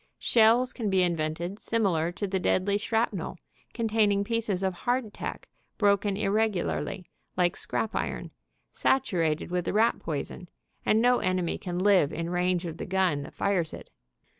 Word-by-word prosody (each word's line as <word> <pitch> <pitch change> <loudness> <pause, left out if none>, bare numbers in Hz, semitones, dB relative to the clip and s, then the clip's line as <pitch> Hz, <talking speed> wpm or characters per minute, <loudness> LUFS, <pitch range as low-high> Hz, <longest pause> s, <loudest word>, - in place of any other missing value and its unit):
Shells 235 +2 +4
can 220 -4 -2
be 190 -1 +3
invented 170 +3 -2
similar 180 -8 0
to 205 - -3
the 190 -1 -1
deadly 200 +2 +1
shrapnel, 220 -5 -1 0.3
containing 215 -3 +1
pieces 215 -4 -1
of 190 -1 +1
hardtack 240 +3 -3 0.3
broken 200 -1 +2
irregularly, 200 -2 -1 0.3
like 175 -1 +2
scrap 220 - -2
iron, - - -3 0.4
satu 225 -9 +1
rated 160 +1 0
with 180 -1 -1
the - - -1
rat 225 +3 +3
poison, 165 +3 -5 0.4
and 220 +2 +4
no 245 0 +4
enemy 185 -2 -1
can 175 -2 -4
live 185 -5 +4
in 165 +1 -4
range 180 0 0
of 165 -1 -5
the - - -6
gun 185 -6 +1
that 140 - -10
fires 180 -5 0
it. - - -13
190 Hz, 155 wpm, -28 LUFS, 175-215 Hz, 0.4 s, Shells